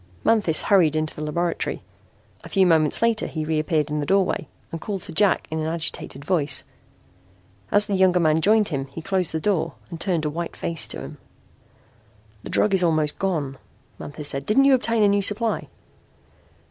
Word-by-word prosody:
Manthis 210 -8 +3
hurried 175 -7 +3
into 155 0 -2
the - - -7
laboratory. 170 - -2 0.6
A - - -10
few 190 -1 +3
moments 160 +1 +2
later 230 -1 +1
he 155 -1 -4
reappeared 155 -1 0
in 150 - -1
the 145 - -2
doorway 195 -1 +1 0.2
and 165 - -6
called 195 -4 -4
to - - -8
Jack 200 +4 +2
in 160 - -2
an 155 - -2
agitated 160 -4 -4
voice. 155 -5 +1 1.1
As 205 0 +5
the 205 - -3
younger 185 -2 +3
man 160 -1 +2
joined 215 +3 +3
him 135 -4 -3
he 145 +4 -9
closed 185 -2 0
the 160 - -2
door 165 - -1 0.2
and 165 - -7
turned 175 -5 0
a - - 0
white 170 +2 -5
face 165 -2 -1
to - - -5
him. - - -9 1.2
"The - - -9
drug 210 - +2
is 190 - +3
almost 155 -3 +1
gone," 150 -9 -2 0.4
Manthis 145 0 -6
said. 140 -1 -4
"Didn't 270 +6 +4
you 275 - +6
obtain 230 -3 +2
a - - +5
new 200 0 +2
supply?" 210 +3 0
170 Hz, 185 wpm, -23 LUFS, 155-200 Hz, 1.2 s, you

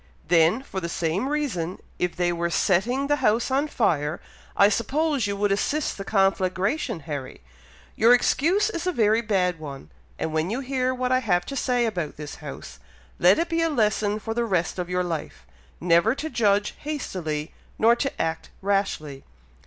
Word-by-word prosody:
"Then, 175 +8 +4
for 195 -8 -5
the 170 -2 -4
same 170 +10 -1
reason, 220 - -2 0.2
if 180 0 -1
they 175 -1 +1
were 170 0 -1
setting 220 +11 +1
the 290 +1 +1
house 225 +1 +1
on 275 +3 +2
fire, 160 - 0 0.4
I 200 - +7
suppose 270 +4 0
you 200 0 -2
would 205 0 +1
assist 290 +9 0
the 195 - -6
conflagration, 195 - 0
Harry. 140 -3 -6 0.5
Your 230 +2 +5
excuse 345 - +3
is 340 -1 -4
a - - +2
very 220 -5 +3
bad 185 -6 0
one; 140 - -9 0.3
and 160 - -3
when 160 +2 0
you 240 +6 -2
hear 255 -1 0
what 255 0 -2
I 255 - +4
have 180 -7 +1
to 275 - -6
say 250 -2 +1
about 175 -9 -3
this 150 -1 -7
house, - - -9 0.4
let 180 +3 +6
it 335 - 0
be 330 0 0
a 330 - +2
lesson 215 -5 +1
for 225 +1 -4
the 235 +1 0
rest 185 -5 -1
of 180 0 -3
your 180 0 0
life, 155 - -5 0.3
never 175 +7 +3
to 315 +2 -5
judge 205 -2 +2
hastily, 175 - -4 0.2
nor 230 +2 +5
to 275 +2 -1
act 160 0 -2
rashly. 190 -8 -1
200 Hz, 180 wpm, -25 LUFS, 175-255 Hz, 0.5 s, I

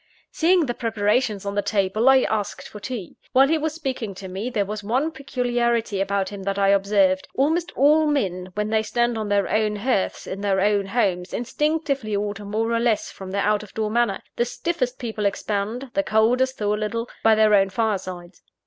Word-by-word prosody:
Seeing 340 0 +3
the 240 - -2
preparations 215 -2 0
on 200 - -2
the 205 - +1
table, 200 +4 +2
I 265 -1 +6
asked 210 -2 -2
for 210 - -10
tea. 210 -5 -6 0.2
While 270 +1 +6
he 320 0 +2
was 310 0 -2
speaking 255 - -4
to 190 0 -8
me, 195 +6 -4
there 210 -5 0
was 210 +1 -5
one 255 +9 0
peculiarity 240 -7 -1
about 195 -1 0
him 200 -1 -8
that 195 +1 -2
I 195 0 +3
observed. 195 -1 +3
Almost 320 +5 +1
all 300 +3 +4
men, 190 -11 -1
when 210 0 -1
they 220 0 +2
stand 240 +2 0
on 215 -2 -3
their 200 -1 +2
own 215 -1 +1
hearths, 210 -2 -1
in 195 - -6
their 195 -1 +1
own 200 0 +2
homes, 190 -5 0
instinctively 280 -3 -1
alter 205 0 -3
more 220 +3 -1
or 230 - +2
less 230 -2 0
from 190 -1 -9
their 200 +1 -1
out 210 0 +2
of 210 - -13
door 215 -1 -1
manner: 230 -4 +1
the - - +3
stiffest 255 -2 -2
people 220 -4 -2
expand, 215 +6 -3
the 295 - +2
coldest 250 +2 +2
thaw 210 -1 0
a - - +1
little, 230 +2 -2 0.2
by 225 -1 +6
their 215 -1 +4
own 195 -1 +4
firesides. 185 -5 -3
215 Hz, 205 wpm, -23 LUFS, 200-250 Hz, 0.2 s, I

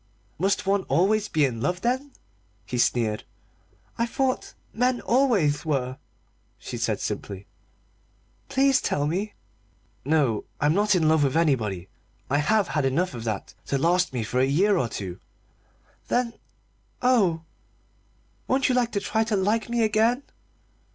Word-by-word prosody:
"Must 195 +3 +1
one 195 0 +2
always 210 +4 +2
be 155 -7 +2
in 115 -4 -3
love, 180 +7 -1
then?" 260 +4 -1 0.5
he 125 - -3
sneered. 115 -3 +1 0.8
"I 235 - +2
thought 260 +2 -1 0.2
men 250 +1 +1
always 215 - +2
were," 135 -3 -2 0.6
she - - -7
said - - -1
simply. 100 -1 -5 1.0
"Please 270 0 +3
tell 145 - 0
me." 190 +8 -2 0.7
"No, 140 -7 +1
I'm 150 +1 +3
not 205 +2 +3
in 165 -3 +2
love 155 -1 +4
with 140 +2 +1
anybody. 110 - 0 0.4
I 145 - +3
have 205 +7 +2
had 150 -1 0
enough 140 +6 0
of 120 -2 -7
that 110 -3 -4
to 140 - 0
last 175 +5 +2
me 125 -3 -2
for 125 +4 -1
a 130 - +4
year 185 +10 +3
or 130 -10 0
two." 95 -4 -6 0.9
"Then 245 -1 0 0.7
oh, 195 -10 +3 1.0
won't 265 +1 +2
you 250 -2 +2
try 220 +2 0
to 220 -2 0
like 210 +3 0
me 235 -1 +1
again? 225 +5 +2
180 Hz, 145 wpm, -25 LUFS, 135-225 Hz, 1.0 s, love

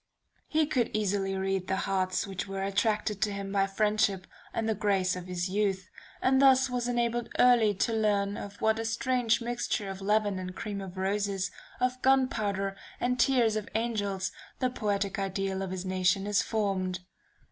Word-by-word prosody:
He 315 0 +2
could 255 -6 0
easily 200 -2 0
read 190 -1 -1
the 190 - +1
hearts 185 0 0
which 195 -1 -5
were 195 0 -3
attracted 205 +1 0
to 210 - +2
him 200 -1 -5
by 195 -1 +2
friendship 200 -2 +1 0.3
and 225 - -2
the 220 - +2
grace 195 -3 +1
of 180 0 -7
his 180 0 -2
youth, 195 -1 0 0.4
and 265 +1 +4
thus 265 -1 +5
was 245 -1 -1
enabled 240 -1 0
early 235 -4 +5
to 225 +4 0
learn 205 -2 +1
of 200 0 -8
what 220 0 +2
a - - -1
strange 240 +1 +1
mixture 235 -4 -2
of 195 0 -8
leaven 205 -1 +1
and 185 0 -6
cream 205 -2 -4
of 190 -1 -8
roses, 195 -1 -1 0.3
of 255 0 0
gunpowder 215 -7 +1 0.2
and 250 0 0
tears 235 -4 +3
of 215 -1 -3
angels, 205 -4 -1 0.3
the 255 -1 0
poetic 200 -3 -1
Ideal 195 0 -2
of 190 - -3
his 185 0 -4
nation 185 +1 +1
is 205 -1 +2
formed. 190 -4 -1
205 Hz, 175 wpm, -29 LUFS, 195-225 Hz, 0.4 s, thus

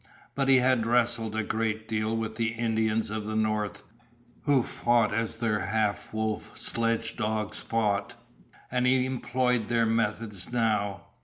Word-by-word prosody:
But 135 -1 0
he 135 - +8
had 125 -2 +3
wrestled 115 -2 +1
a 110 - 0
great 110 0 -2
deal 110 0 -1
with 110 -1 -3
the 115 0 0
Indians 110 -2 0
of 110 -1 -3
the 110 - -3
north, 110 -2 -1 0.6
who 140 -4 +4
fought 120 -2 +2
as 115 0 -1
their 115 -2 0
half 110 -2 0
wolf 110 0 -3
sledgedogs 110 -2 -1
fought, 110 +1 -1 0.6
and 125 0 +2
he 130 0 +4
employed 125 -2 0
their 115 -1 +2
methods 110 -3 -1
now. 110 -4 0
115 Hz, 145 wpm, -28 LUFS, 110-120 Hz, 0.6 s, he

